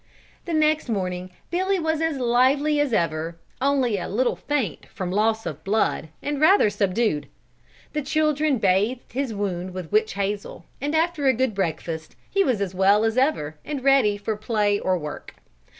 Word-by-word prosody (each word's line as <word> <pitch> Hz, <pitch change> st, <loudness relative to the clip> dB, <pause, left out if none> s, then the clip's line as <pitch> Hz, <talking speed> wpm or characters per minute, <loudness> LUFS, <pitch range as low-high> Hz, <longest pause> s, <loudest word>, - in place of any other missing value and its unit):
The 340 Hz, -, -3 dB
next 310 Hz, -3 st, +2 dB
morning 185 Hz, -3 st, -2 dB, 0.2 s
Billy 380 Hz, +2 st, +1 dB
was 320 Hz, -1 st, 0 dB
as 325 Hz, -3 st, 0 dB
lively 265 Hz, +5 st, +3 dB
as 290 Hz, -3 st, +1 dB
ever, 165 Hz, -3 st, -1 dB, 0.2 s
only 260 Hz, -6 st, +2 dB
a -, -, -5 dB
little 240 Hz, +6 st, +1 dB
faint 270 Hz, -, -2 dB
from 180 Hz, -2 st, -5 dB
loss 220 Hz, +3 st, +1 dB
of 155 Hz, -4 st, -6 dB
blood 195 Hz, -5 st, 0 dB
and 290 Hz, 0 st, -2 dB
rather 315 Hz, -, +5 dB
subdued. 205 Hz, -5 st, 0 dB, 0.7 s
The 300 Hz, -, -1 dB
children 305 Hz, 0 st, +1 dB
bathed 210 Hz, +5 st, +1 dB
his 265 Hz, -1 st, -1 dB
wound 185 Hz, -3 st, -3 dB
with 180 Hz, -4 st, -6 dB
witch 215 Hz, +1 st, +2 dB
hazel, 200 Hz, +1 st, -3 dB, 0.2 s
and 295 Hz, +3 st, -1 dB
after 320 Hz, -3 st, +1 dB
a 260 Hz, -, +5 dB
good 260 Hz, -1 st, 0 dB
breakfast, 165 Hz, -4 st, -3 dB
he 395 Hz, 0 st, +2 dB
was 250 Hz, -, 0 dB
as 195 Hz, -2 st, -2 dB
well 195 Hz, +3 st, +4 dB
as 225 Hz, 0 st, +1 dB
ever, 160 Hz, -, 0 dB
and 285 Hz, -4 st, -5 dB
ready 270 Hz, -7 st, +4 dB
for 210 Hz, +1 st, -3 dB
play 210 Hz, -1 st, 0 dB
or 185 Hz, -1 st, +1 dB
work. 150 Hz, -3 st, -7 dB
225 Hz, 170 wpm, -24 LUFS, 190-285 Hz, 0.7 s, rather